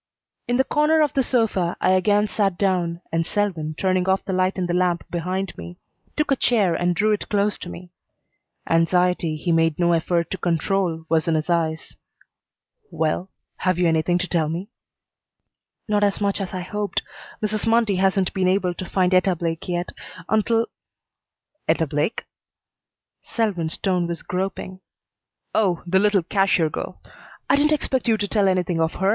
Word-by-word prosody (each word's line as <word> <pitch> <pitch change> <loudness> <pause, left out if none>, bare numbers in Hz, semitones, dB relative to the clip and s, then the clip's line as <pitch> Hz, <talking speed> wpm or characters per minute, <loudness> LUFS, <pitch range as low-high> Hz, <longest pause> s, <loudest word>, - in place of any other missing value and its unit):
In 245 - +1
the 265 - +4
corner 305 +3 +2
of 295 -3 +2
the 270 - +2
sofa 225 -9 0
I - - +2
again 205 +3 +3
sat 195 -3 0
down, 175 -3 0
and 165 0 +1
Selwyn, 165 -5 -2
turning 185 -1 +1
off 190 0 +1
the 190 - -3
light 185 +1 +1
in 185 - 0
the 175 - -2
lamp 180 -1 +1
behind 185 +3 -3
me, 85 +1 -9 0.4
took 300 -2 0
a - - +5
chair 215 -9 +2
and 175 +1 0
drew 215 +4 +2
it 210 - -2
close 205 0 +1
to 180 - -7
me. 175 0 -10 0.8
Anxiety 170 0 +2
he 160 +3 -2
made 165 -1 +2
no 175 -1 +3
effort 170 +1 0
to 190 - -3
control 170 -1 0
was 160 0 +1
in 165 - +2
his 155 +2 -1
eyes. 160 -2 -1 0.9
"Well 165 +4 -1 0.3
have 185 -1 0
you 180 -1 +3
anything 165 +2 +2
to 180 +1 -2
tell 160 -4 0
me?" 180 +7 -5 1.2
"Not 210 -1 +1
as 200 -1 +1
much 200 0 0
as 190 - -4
I 185 - -4
hoped. 205 +3 -3 0.4
Mrs. 215 +1 -2
Mundy 225 -4 +3
hasn't 190 0 +1
been 185 -1 +1
able 185 -1 +1
to 180 +1 -7
find 185 -1 +2
Etta 185 0 +3
Blake 165 -1 -3
yet. 175 0 -2 0.4
Until 225 +2 +2 0.5
" 300 - -55
"Etta 160 0 +2
Blake?" 150 +7 -1 1.0
Selwyn's 185 -9 -2
tone 180 -3 0
was 170 -1 -5
groping. 185 0 -4 0.7
"Oh, 190 -6 +1
the 190 +2 +3
little 205 -2 +3
cashier 185 -3 +2
girl. - - -6 0.5
I - - +4
didn't 295 +2 +3
expect 270 -4 0
you 225 -1 +3
to 205 -1 -2
tell 200 -1 +2
anything 180 -3 +1
of 160 0 +1
her. 190 +1 +1
185 Hz, 175 wpm, -23 LUFS, 170-205 Hz, 1.2 s, a